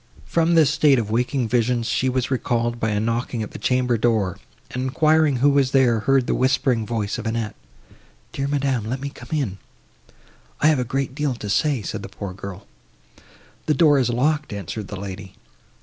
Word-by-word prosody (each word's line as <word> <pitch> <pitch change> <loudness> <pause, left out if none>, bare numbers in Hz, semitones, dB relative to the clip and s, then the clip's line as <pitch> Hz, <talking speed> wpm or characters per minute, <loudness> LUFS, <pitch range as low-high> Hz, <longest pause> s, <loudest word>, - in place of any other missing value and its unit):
From 170 0 +2
this 155 -3 +5
state 150 -3 +4
of 110 -3 -2
waking 125 +2 0
visions 120 0 +1
she 130 +3 +1
was 130 +1 -1
recalled 120 -2 0
by 110 - 0
a 105 -1 0
knocking 115 +1 -1
at 105 - -7
the - - -8
chamber 125 -2 +1
door, 110 -6 +1 0.3
and, 125 - -3
enquiring 155 +3 +3
who 140 +4 +4
was 140 -2 +2
there, 125 -4 +4
heard 135 +3 +2
the - - 0
whispering 130 -3 +1
voice 110 -2 -2
of 115 - -5
Annette. 110 -2 -2 0.8
"Dear 135 0 -2
madam, 135 -5 0
let 130 +2 -2
me 140 +1 -4
come - - -13
in, 130 -12 -2 1.0
I 150 - +4
have 150 -4 +3
a - - +1
great 135 +2 -2
deal 145 -2 -1
to 105 -4 -5
say," 140 -2 +1
said - - -4
the - - -8
poor 100 -2 -7
girl. 100 0 -8 1.0
"The 155 - +3
door 145 -1 +5
is 125 -2 +1
locked," 145 +4 0
answered 100 +1 -5
the 100 -1 -7
lady. 95 0 -8
125 Hz, 195 wpm, -22 LUFS, 110-140 Hz, 1.0 s, this